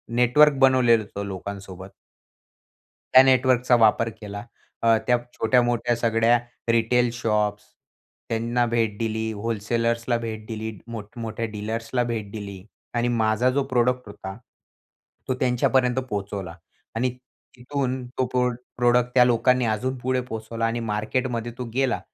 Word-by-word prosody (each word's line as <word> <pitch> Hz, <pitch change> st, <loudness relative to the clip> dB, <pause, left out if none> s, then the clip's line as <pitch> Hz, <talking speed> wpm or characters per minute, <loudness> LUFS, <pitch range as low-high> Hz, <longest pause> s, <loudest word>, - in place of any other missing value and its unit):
network 140 Hz, +4 st, +5 dB
बनवलेलं 125 Hz, -4 st, +5 dB
होतं 100 Hz, 0 st, -6 dB
लोकांसोबत 95 Hz, 0 st, -8 dB, 1.2 s
त्या 130 Hz, -, +10 dB
नेटवर्कचा 130 Hz, -1 st, +4 dB
वापर 115 Hz, 0 st, +4 dB
केला, 100 Hz, +1 st, -7 dB, 0.4 s
अ, 115 Hz, -1 st, +4 dB
त्या 125 Hz, -, +4 dB, 0.2 s
छोट्या-मोठ्या 120 Hz, 0 st, +2 dB
सगळ्या 115 Hz, 0 st, +3 dB, 0.3 s
रिटेल 120 Hz, +1 st, +2 dB
शॉप्स 105 Hz, -3 st, 0 dB, 0.7 s
त्यांना 115 Hz, +2 st, 0 dB
भेट 115 Hz, -3 st, 0 dB
दिली, 110 Hz, 0 st, -2 dB
व्होलसेलर्सला 115 Hz, +2 st, -1 dB
भेट 110 Hz, -2 st, -6 dB
दिली, 110 Hz, -1 st, -4 dB, 0.2 s
मोठ्या-मोठ्या 115 Hz, +1 st, -5 dB
डीलर्सला 115 Hz, +3 st, -2 dB
भेट 110 Hz, -4 st, -4 dB
दिली 100 Hz, -3 st, -7 dB, 0.3 s
आणि 120 Hz, +1 st, +1 dB
माझा 115 Hz, 0 st, +2 dB
जो 140 Hz, +2 st, +1 dB
प्रोडक्ट 125 Hz, -1 st, +1 dB
होता, 95 Hz, -1 st, -8 dB, 0.9 s
तो 130 Hz, -, +1 dB
त्यांच्यापर्यंत 125 Hz, 0 st, +2 dB
पोहोचवला 100 Hz, -4 st, -4 dB, 0.4 s
आणि 125 Hz, +3 st, +1 dB, 0.5 s
तिथून 130 Hz, 0 st, -3 dB
तो 130 Hz, -, +2 dB
प्रो 125 Hz, 0 st, +1 dB, 0.3 s
प्रोडक्ट 120 Hz, 0 st, +2 dB
त्या 125 Hz, -, +8 dB
लोकांनी 125 Hz, +1 st, +3 dB
अजून 125 Hz, +4 st, -1 dB
पुढे 130 Hz, +1 st, -1 dB
पोहोचवला 110 Hz, +1 st, -3 dB
आणि 115 Hz, +1 st, -1 dB
मार्केटमध्ये 115 Hz, +2 st, -2 dB
तो 125 Hz, -, -4 dB
गेला 130 Hz, -1 st, +1 dB
115 Hz, 125 wpm, -24 LUFS, 110-125 Hz, 1.2 s, त्या